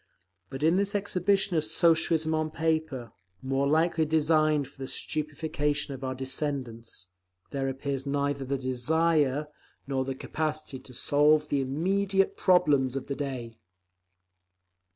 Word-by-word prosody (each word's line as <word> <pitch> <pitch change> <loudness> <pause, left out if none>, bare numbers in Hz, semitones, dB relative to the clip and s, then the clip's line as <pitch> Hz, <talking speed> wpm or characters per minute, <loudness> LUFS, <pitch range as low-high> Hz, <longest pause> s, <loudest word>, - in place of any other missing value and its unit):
But 135 +2 -6
in 165 +3 +4
this 200 +1 0
exhibition 195 -1 +1
of 155 - +2
Socialism 160 0 +2
on 155 0 0
Paper—more 135 - -2
likely 160 +2 +2
designed 155 -2 +2
for 135 0 -16
the 135 - -4
stupefaction 150 -1 -1
of 135 0 -8
our 130 0 -2
descendants—there 120 -5 -5
appears 135 0 -3
neither 140 0 -1
the 135 +1 -2
desire 145 +3 +1 0.4
nor 135 -1 -1
the 135 0 -4
capacity 155 -1 -3
to 125 -1 -13
solve 150 +3 +3
the 140 - +1
immediate 190 +8 +1
problems 145 -8 +3
of 135 - -3
the 140 - -4
day! 125 -5 -5
145 Hz, 125 wpm, -28 LUFS, 130-160 Hz, 0.4 s, in